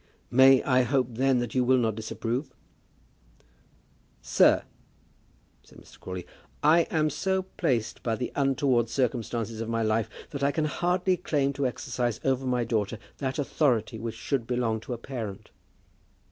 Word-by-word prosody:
"May 130 Hz, +1 st, +7 dB
I 130 Hz, -1 st, +3 dB
hope, 125 Hz, 0 st, +1 dB
then, 130 Hz, +3 st, +2 dB
that 120 Hz, -, -4 dB
you 130 Hz, -, +2 dB
will 130 Hz, +1 st, +4 dB
not 115 Hz, -3 st, +1 dB
disapprove?" 115 Hz, +5 st, -4 dB, 1.6 s
"Sir," -, -, +4 dB, 1.0 s
said -, -, -19 dB
Mr. -, -, -17 dB
Crawley, 90 Hz, -1 st, -6 dB, 0.4 s
"I 165 Hz, +2 st, +5 dB
am 155 Hz, -1 st, +1 dB
so 190 Hz, +6 st, 0 dB
placed 135 Hz, -, -2 dB
by 115 Hz, -2 st, -1 dB
the 125 Hz, +2 st, -4 dB
untoward 135 Hz, -4 st, +2 dB
circumstances 115 Hz, -3 st, -2 dB
of 115 Hz, -, -4 dB
my 115 Hz, 0 st, 0 dB
life 110 Hz, 0 st, +1 dB, 0.2 s
that 140 Hz, -, -5 dB
I 140 Hz, -, +3 dB
can 155 Hz, +1 st, 0 dB
hardly 180 Hz, +4 st, +1 dB
claim 145 Hz, -5 st, 0 dB
to 140 Hz, -1 st, 0 dB
exercise 120 Hz, -1 st, -2 dB
over 135 Hz, 0 st, 0 dB
my 125 Hz, -1 st, +1 dB
own 115 Hz, -, -2 dB
daughter 110 Hz, -2 st, -1 dB, 0.2 s
that 130 Hz, -2 st, -2 dB
authority 130 Hz, -6 st, 0 dB
which 115 Hz, 0 st, -5 dB
should 130 Hz, -5 st, -2 dB
belong 120 Hz, -3 st, 0 dB
to 125 Hz, -, -6 dB
a -, -, -4 dB
parent." 115 Hz, -5 st, -7 dB
125 Hz, 160 wpm, -27 LUFS, 115-140 Hz, 1.6 s, May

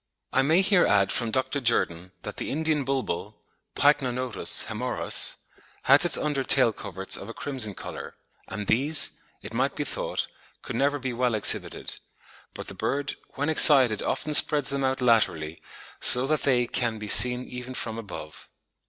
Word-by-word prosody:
I 135 Hz, -, +3 dB
may 160 Hz, +7 st, +3 dB
here 195 Hz, -2 st, +3 dB
add 100 Hz, -1 st, +2 dB
from 115 Hz, 0 st, -1 dB
Dr. 130 Hz, +4 st, -1 dB
Jerdon 90 Hz, -7 st, -1 dB
that -, -, -7 dB
the -, -, -5 dB
Indian 155 Hz, 0 st, -1 dB
bulbul 135 Hz, -9 st, -4 dB, 0.4 s
(Pycnonotus 130 Hz, -4 st, +1 dB
hoemorrhous) -, -, -2 dB, 0.5 s
has 140 Hz, +5 st, +5 dB
its 175 Hz, -, +2 dB
under 145 Hz, -3 st, -2 dB
tail 130 Hz, -4 st, +3 dB
coverts 95 Hz, -2 st, -4 dB
of -, -, -7 dB
a 115 Hz, -, -9 dB
crimson 125 Hz, -8 st, -3 dB
colour, -, -, -9 dB, 0.3 s
and 105 Hz, -1 st, -6 dB
these, 140 Hz, +8 st, +1 dB, 0.2 s
it -, -, -9 dB
might -, -, -1 dB
be -, -, -3 dB
thought, -, -, -3 dB, 0.4 s
could -, -, -7 dB
never 145 Hz, +1 st, 0 dB
be 130 Hz, -2 st, -5 dB
well 120 Hz, -1 st, 0 dB
exhibited; 105 Hz, -, +2 dB, 0.6 s
but -, -, -8 dB
the -, -, -9 dB
bird 140 Hz, 0 st, -2 dB, 0.2 s
"when 145 Hz, +2 st, -2 dB
excited 135 Hz, -8 st, +5 dB
often 155 Hz, -, -3 dB
spreads 145 Hz, -1 st, +4 dB
them 140 Hz, -1 st, -2 dB
out 130 Hz, 0 st, -1 dB
laterally, 85 Hz, -10 st, +1 dB, 0.4 s
so 125 Hz, +1 st, +6 dB
that 155 Hz, +2 st, -1 dB
they 125 Hz, -3 st, +1 dB
can 120 Hz, -1 st, -2 dB
be 105 Hz, 0 st, -8 dB
seen 125 Hz, +4 st, +5 dB
even 125 Hz, +1 st, -8 dB
from 115 Hz, -2 st, -5 dB
above." 90 Hz, -8 st, -10 dB
125 Hz, 165 wpm, -25 LUFS, 110-140 Hz, 0.6 s, so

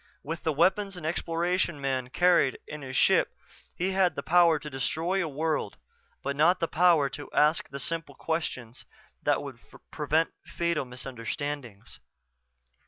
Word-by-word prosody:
With 165 Hz, +3 st, -5 dB
the 160 Hz, -, 0 dB
weapons 190 Hz, +5 st, +2 dB
an 165 Hz, -, -7 dB
Exploration 170 Hz, 0 st, 0 dB
man 130 Hz, -2 st, -2 dB
carried 175 Hz, -3 st, +3 dB
in 150 Hz, -, -8 dB
his 130 Hz, -1 st, -7 dB
ship -, -, +3 dB, 0.4 s
he 185 Hz, +2 st, -1 dB
had 190 Hz, -2 st, +2 dB
the -, -, -4 dB
power 170 Hz, -2 st, +5 dB
to 150 Hz, -, -8 dB
destroy 165 Hz, +7 st, -1 dB
a -, -, -2 dB
world 150 Hz, -6 st, -2 dB, 0.5 s
but 140 Hz, +1 st, -2 dB
not 170 Hz, +5 st, +4 dB
the 165 Hz, -, 0 dB
power 165 Hz, -4 st, +4 dB
to 145 Hz, +1 st, -8 dB
ask 150 Hz, +2 st, +3 dB
the 140 Hz, -, -6 dB
simple 165 Hz, -3 st, -3 dB
questions 130 Hz, -8 st, -4 dB, 0.4 s
that -, -, +1 dB
would -, -, -8 dB, 0.3 s
prevent 155 Hz, +2 st, +1 dB
fatal 170 Hz, -4 st, -1 dB
misunderstandings. 125 Hz, -2 st, -6 dB
155 Hz, 150 wpm, -28 LUFS, 140-170 Hz, 0.5 s, power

